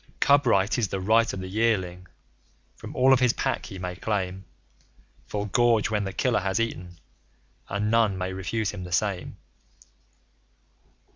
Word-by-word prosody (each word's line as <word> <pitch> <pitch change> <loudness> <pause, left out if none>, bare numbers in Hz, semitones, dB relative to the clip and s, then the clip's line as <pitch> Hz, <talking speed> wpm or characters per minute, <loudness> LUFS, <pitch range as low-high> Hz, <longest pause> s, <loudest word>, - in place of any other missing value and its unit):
Cub 140 -1 +4
Right 100 +1 +2
is 110 - +1
the 95 - -3
right 110 +4 +3
of 95 - -5
the 95 - -6
Yearling. 95 -4 -1 0.7
From - - -10
all 130 +1 +5
of 130 - +4
his 125 -2 +3
Pack - - -2
he 95 - -8
may 90 -1 -5
claim 95 -2 -3 0.8
Full 105 0 -3
gorge 115 0 +2
when 105 -2 0
the 95 - -3
killer 125 +3 +1
has 95 0 -1
eaten; 90 -6 -4 0.7
and 105 +2 -1
none 115 -4 +3
may 95 0 -3
refuse 100 +3 -2
him 100 -3 -7
the 90 - -8
same. 95 +1 -1
100 Hz, 160 wpm, -26 LUFS, 95-115 Hz, 0.8 s, all